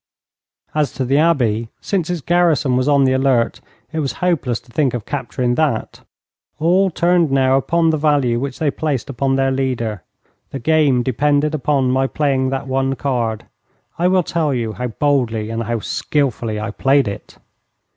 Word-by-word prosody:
As 150 -2 0
to 130 - -2
the 135 +3 +2
Abbey, 120 -9 +1
since 180 -5 -2
its 175 -3 -2
garrison 165 -6 +2
was 130 +2 +1
on 140 -1 +4
the 130 -1 +3
alert 130 -3 +1 0.3
it 160 - -3
was 135 -6 -2
hopeless 140 -8 -1
to 120 - -22
think 135 -2 +1
of 115 - -5
capturing 130 -3 -2
that. 140 -5 -1 0.6
All 180 +5 +3
turned 175 -1 +2
now 135 -1 +3
upon 165 +4 +2
the 155 - 0
value 140 -6 +2
which 135 0 -4
they 150 -3 0
placed 140 -3 -3
upon 135 +1 0
their 135 0 +1
leader. 125 -6 -2 0.5
The - - -5
game 140 -2 +2
depended 145 +4 +1
upon 135 -3 +1
my 135 +1 +1
playing 135 -3 0
that 135 +1 -3
one 135 0 0
card. 120 -5 -2 0.5
I 175 - +3
will 185 0 +3
tell 155 -4 -1
you 115 -3 -2
how 125 +2 -3
boldly 115 -4 0
and 115 0 -2
how 115 0 -2
skilfully 120 -7 -1
I 110 +1 -4
played 135 +2 +2
it. 100 - -7
135 Hz, 175 wpm, -18 LUFS, 120-150 Hz, 0.6 s, on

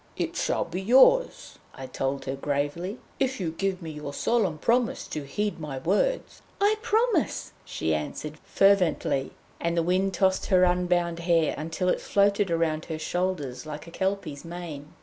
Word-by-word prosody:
'It - - -2
shall - - 0
be 175 +2 -5
yours,' 265 - +4 0.2
I 135 - -7
told 135 +1 -3
her 135 - -2
gravely, 145 - -2 0.2
'if 265 -2 0
you 170 -4 -2
give 185 +2 -2
me 160 - -5
your 150 -2 -7
solemn 200 -10 +1
promise 235 +7 +1
to 150 - -4
heed 205 +5 -2
my 150 -4 -5
words.' 205 - 0 0.2
'I 415 +2 +3
promise!' 445 - +1
she 80 - -2
answered 150 - -4
fervently, 185 -8 +2 0.3
and 170 0 -1
the 170 - +3
wind 185 +2 +1
tossed 190 +1 +2
her 185 -1 +4
unbound 180 -1 +1
hair 170 -2 +2
until 165 +4 -3
it - - +1
floated 200 -1 +2
round 165 -2 0
her 160 -2 -4
shoulders 155 -5 -3
like 150 -1 -7
a 170 - -11
Kelpie's 190 -7 -2
mane. 165 -4 -7
175 Hz, 165 wpm, -26 LUFS, 155-195 Hz, 0.3 s, yours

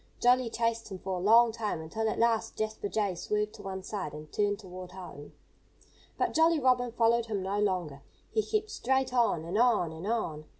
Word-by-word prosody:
Jolly 245 0 +4
chased 230 0 -1
him 190 - -5
for 190 +1 -4
a - - -5
long 230 +3 +6
time, 215 -6 -3
until 220 +8 -2
at - - -3
last 230 -1 +1
Jasper 215 -1 -3
Jay 205 -3 0
swerved 210 +4 -2
to 210 - -11
one 190 -1 -6
side 195 -9 -4
and 150 0 -10
turned 205 -1 +1
toward 185 -2 -10
home. 175 -6 -10 0.8
But - - 0
Jolly 325 0 +4
Robin 250 -2 +2
followed 235 0 +2
him 205 -4 -2
no 195 +2 -1
longer. 180 -9 -1 0.3
He 435 - +3
kept 430 0 -2
straight 265 0 0
on, 230 -10 +2
and 185 +6 -1
on, 230 -9 +3
and 160 +4 -7
on. 165 -10 -2
210 Hz, 200 wpm, -30 LUFS, 185-235 Hz, 0.8 s, long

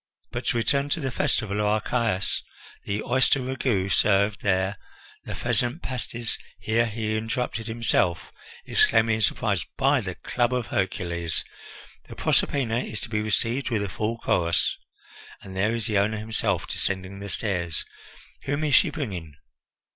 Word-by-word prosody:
But - - -4
to - - +1
return 140 +4 +1
to 165 - 0
the 135 -4 -2
festival 105 -3 0
of 105 - +2
Archias: 110 -2 0 0.4
the 100 +1 -2
oyster 130 +2 +3
ragout 125 -7 0
served 100 +1 +3
there, 95 0 +1 0.5
the - - -5
pheasant 125 +8 0
pasties 120 -2 -2
" - - -30
Here 115 +2 +2
he 110 -1 -2
interrupted 115 +1 -2
himself, 110 -6 +1 0.3
exclaiming 110 0 +4
in - - -3
surprise: 95 - +1
"By - - +3
the - - -5
club 125 0 0
of 125 -2 -1
Hercules, 85 -4 -1 0.6
the - - -9
Proserpina 120 -5 +2
is 110 -4 -4
to - - -6
be 110 -1 0
received 115 +5 +1
with 110 -4 0
a 100 - -3
full 110 +5 -2
chorus! 85 -6 +1 0.7
And 95 -1 -9
there 105 +5 +2
is 115 - -2
the 105 -4 +2
owner 105 +2 +1
himself 110 0 0
descending 95 0 -2
the 100 0 -6
stairs! 90 -6 -1 0.6
Whom 145 +3 -1
is 150 -2 +1
she - - +6
bringing?" 90 - -5
110 Hz, 155 wpm, -26 LUFS, 100-120 Hz, 0.7 s, she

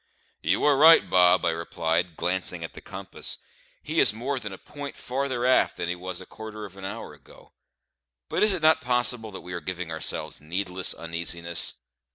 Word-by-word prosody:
"You 85 +5 +1
are 145 -2 +5
right, 160 +3 +8
Bob," 90 -1 +5
I - - +3
replied, 80 0 -1
glancing 90 -1 0
at 80 - -6
the - - -10
compass; - - -2 0.5
"he - - 0
is 100 - +5
more 130 +5 -2
than 105 -4 -6
a 95 - -8
point 145 +5 -8
farther 130 -1 -2
aft 130 0 +3
than 85 - -2
he 90 - -1
was 90 0 -5
a - - -9
quarter 110 -1 -8
of 95 -2 -12
an 95 -1 -8
hour 95 - -6
ago; - - -18 0.7
but - - -1
is 210 - +5
it 180 -4 -1
not 160 0 +5
possible 125 -2 +1
that 95 - -9
we 90 - -8
are 85 - -4
giving 90 0 -4
ourselves 80 -2 -2
needless 90 +3 0
uneasiness? 85 0 -2
95 Hz, 195 wpm, -26 LUFS, 85-125 Hz, 0.7 s, right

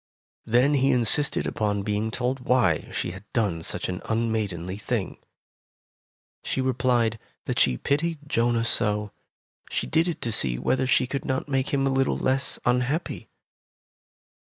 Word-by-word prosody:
Then 125 +6 +4
he 135 -1 +3
insisted 125 +3 +2
upon 105 -2 -1
being 105 +2 -1
told 125 +3 -1
why 125 -10 +2
she - - -2
had 95 +2 -10
done 100 -8 0
such - - -3
an 90 -1 -4
unmaidenly 105 -5 -1
thing. 110 -4 -3 1.2
She - - -2
replied 125 -3 +1 0.3
that - - -1
she 65 -2 +3
pitied 160 - 0
Jonah 115 -4 +1
so, 105 -3 +1 0.6
she - - -1
did 165 +2 +2
it 170 - -2
to 115 - -1
see 65 - 0
whether 130 - +1
she 130 - +3
could 135 +2 -3
not 130 +2 -2
make 135 -1 0
him 135 -1 +1
a 135 - +2
little 135 0 +1
less 130 +1 0
unhappy. 125 +7 0
120 Hz, 150 wpm, -25 LUFS, 105-135 Hz, 1.2 s, Then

